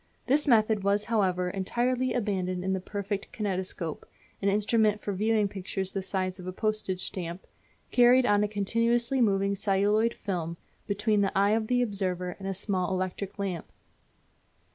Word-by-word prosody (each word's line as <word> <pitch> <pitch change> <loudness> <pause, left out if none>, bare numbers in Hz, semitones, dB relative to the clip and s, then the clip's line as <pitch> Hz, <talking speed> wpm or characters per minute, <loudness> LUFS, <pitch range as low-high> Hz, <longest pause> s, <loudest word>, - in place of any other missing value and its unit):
This 290 +4 +2
method 220 -4 +4
was, 200 +1 +2
however, 185 -5 +1
entirely 245 +7 0
abandoned 185 -5 -1
in 190 0 0
the 190 - 0
perfected 200 +1 -4
kinetoscope, 185 -6 -3 0.4
an 200 - +2
instrument 210 +1 +2
for 205 - -3
viewing 215 +1 +2
pictures 190 -1 -4
the 195 - -2
size 185 0 -2
of 180 - -8
a - - -2
postage 215 -2 -1
stamp, 175 -1 -3 0.5
carried 245 +1 +6
on 205 -2 +3
a - - +1
continuously 230 +5 +1
moving 200 -2 +2
celluloid 205 +3 +2
film 170 -4 -4 0.3
between 205 +1 +1
the 195 -1 0
eye 200 +1 +4
of 220 0 +1
the 245 +1 +2
observer 185 -5 -2
and 195 - -6
a 195 - -1
small 190 -2 -1
electric 185 +2 -3
lamp. 190 -5 -4
200 Hz, 160 wpm, -28 LUFS, 185-215 Hz, 0.5 s, carried